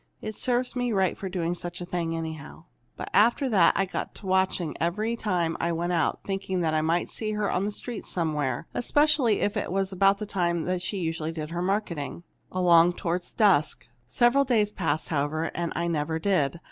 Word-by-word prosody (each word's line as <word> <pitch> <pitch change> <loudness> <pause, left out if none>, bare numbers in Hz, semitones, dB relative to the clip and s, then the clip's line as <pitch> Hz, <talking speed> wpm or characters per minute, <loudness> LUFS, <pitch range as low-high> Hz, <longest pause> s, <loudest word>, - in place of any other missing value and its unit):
It 215 - -5
served 250 +3 -1
me 245 -1 0
right 190 -4 +1
for 190 - -5
doing 175 -2 -1
such 175 0 -6
a 175 - -5
thing, 170 -2 -2
anyhow! 160 -3 -6 0.3
"But - - -6
after 240 +6 +4
that 190 -7 +4
I 195 - +2
got 185 - -5
to - - -10
watching, 190 -4 +1
every 215 +8 0
time 180 -7 -1
I 170 - 0
went 170 +2 -1
out, 165 -3 0
thinking 190 -2 -2
I 155 -1 +1
might 165 +2 +1
see 215 -1 -4
her 210 -1 0
on 185 - 0
the 210 - -1
street 235 +2 -6
somewhere, 150 -6 -1
especially 280 -4 +2
if 205 +1 0
it 205 - -2
was 195 +1 0
about 195 +1 +3
the 210 - -4
time 175 -2 -1
she 190 +3 -3
usually 160 -2 -2
did 155 -1 -6
her 170 +1 -2
marketing 180 -5 -2 0.3
along 175 -1 +5
toward 175 0 -2 0.2
dusk. 185 - +3 0.2
Several 240 - +3
days 220 -6 +2
passed, 160 -6 -1
however, 155 +2 -1
and 170 -1 -2
I 170 +1 -1
never 160 -1 -1
did. 165 -4 +1
180 Hz, 195 wpm, -27 LUFS, 165-205 Hz, 0.3 s, along